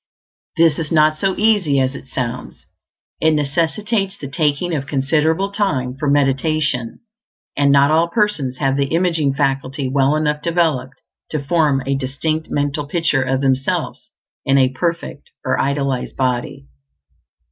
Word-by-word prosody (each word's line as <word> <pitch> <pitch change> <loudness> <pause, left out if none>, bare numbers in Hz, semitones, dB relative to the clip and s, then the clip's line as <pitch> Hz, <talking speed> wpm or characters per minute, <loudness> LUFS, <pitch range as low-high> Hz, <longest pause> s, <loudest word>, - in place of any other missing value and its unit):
This 165 -2 +4
is 155 -3 -4
not 155 -1 +4
so 190 +4 -1
easy 200 -10 +3
as 130 0 +1
it 135 - -10
sounds; 125 -1 -5 0.5
it 160 0 +3
necessitates 190 +8 -1
the 140 - -7
taking 150 +4 0
of 140 -3 -3
considerable 160 +7 +1
time 140 -12 -1
for 140 +1 -2
meditation, 140 -2 0 0.5
and 140 0 +3
not 140 +1 +5
all 165 +2 +3
persons 170 - -1
have 135 -1 0
the 140 -1 +1
imaging 165 -4 +1
faculty 135 0 -1
well 135 +2 +2
enough 150 -1 0
developed 155 -6 0 0.3
to 155 -2 -3
form 145 -3 +1
a 135 - 0
distinct 140 +4 -2
mental 145 0 -2
picture 155 -3 +1
of 130 +1 0
themselves 135 -1 -1 0.3
in 135 0 +2
a 130 -1 +4
perfect 165 +2 -4 0.2
or - - +1
idealized 140 -2 -1
body. 125 - -2
145 Hz, 145 wpm, -19 LUFS, 135-160 Hz, 0.5 s, not